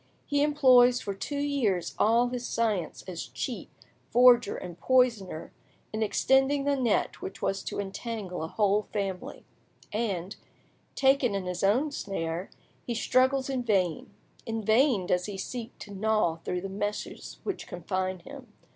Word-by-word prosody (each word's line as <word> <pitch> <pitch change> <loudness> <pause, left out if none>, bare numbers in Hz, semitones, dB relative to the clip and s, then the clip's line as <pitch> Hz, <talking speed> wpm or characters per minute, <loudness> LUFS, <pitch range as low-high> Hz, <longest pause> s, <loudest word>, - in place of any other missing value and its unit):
He 285 -1 +1
employs 255 -4 +5
for 200 - -4
two 280 +9 -4
years 270 -11 0
all 235 +3 +4
his 245 0 -4
science 210 -8 -1
as 175 -3 -5
cheat, 235 -9 -5 0.4
forger, 240 -2 +6
and 175 -2 -8
poisoner 235 -10 +1 0.4
in 215 - -2
extending 265 +6 +3
the 285 0 +2
net 245 -6 0
which - - -6
was 195 - -1
to - - -4
entangle 200 -2 -4
a - - -3
whole 205 +3 +1
family; 195 -3 -4 0.5
and, 200 -4 -2 0.6
taken 265 -5 +3
in 195 -2 -2
his 180 0 -3
own 250 +10 +3
snare, 175 - -3 0.3
he 240 - -3
struggles 260 +3 +2
in 265 -2 -1
vain; 190 -8 0 0.3
in 225 -1 -3
vain 220 -2 +3
does 180 +1 0
he 200 -2 -5
seek 235 +4 -6
to 205 - -10
gnaw 210 -4 +1
through 180 +2 -3
the 195 - -4
meshes 205 +2 -4
which 400 - -4
confine 185 +1 -3
him. 255 +2 -11
215 Hz, 150 wpm, -28 LUFS, 190-255 Hz, 0.6 s, forger